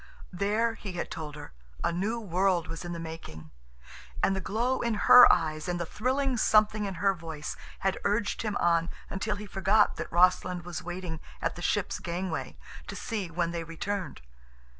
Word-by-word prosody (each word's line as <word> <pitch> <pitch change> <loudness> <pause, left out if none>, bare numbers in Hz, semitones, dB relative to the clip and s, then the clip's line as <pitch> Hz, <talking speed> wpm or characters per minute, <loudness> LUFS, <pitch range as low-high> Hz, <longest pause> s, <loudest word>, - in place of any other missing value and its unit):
There, 210 +5 +1
he 205 -4 -7
had 175 - -4
told 150 -2 -6
her, 145 -1 -10 0.3
a - - +2
new 205 +7 -1
world 185 -3 +1
was 165 +2 -6
in 175 - -5
the 170 - -4
making, 160 - -8 0.7
and 195 - +3
the 190 - -2
glow 240 +7 0
in 235 -2 0
her 250 +4 +9
eyes 155 -2 0
and 175 -1 -1
the 170 - -2
thrilling 260 - 0
something 215 -1 +3
in 195 -2 -4
her 195 +4 +2
voice 160 -4 -6 0.3
had 190 -1 0
urged 205 +1 0
him 215 -2 -1
on 170 -1 +2 0.2
until 205 +2 -1
he 205 +1 -7
forgot 200 +2 +2
that - - -5
Rossland 180 0 +3
was 175 -1 -5
waiting 175 -2 -5 0.2
at - - -1
the - - -8
ship's - - 0
gangway 175 0 -4 0.3
to - - -6
see 210 -7 -3
when 170 0 -1
they 170 -1 -3
returned. 185 +4 -4
185 Hz, 185 wpm, -29 LUFS, 170-210 Hz, 0.7 s, her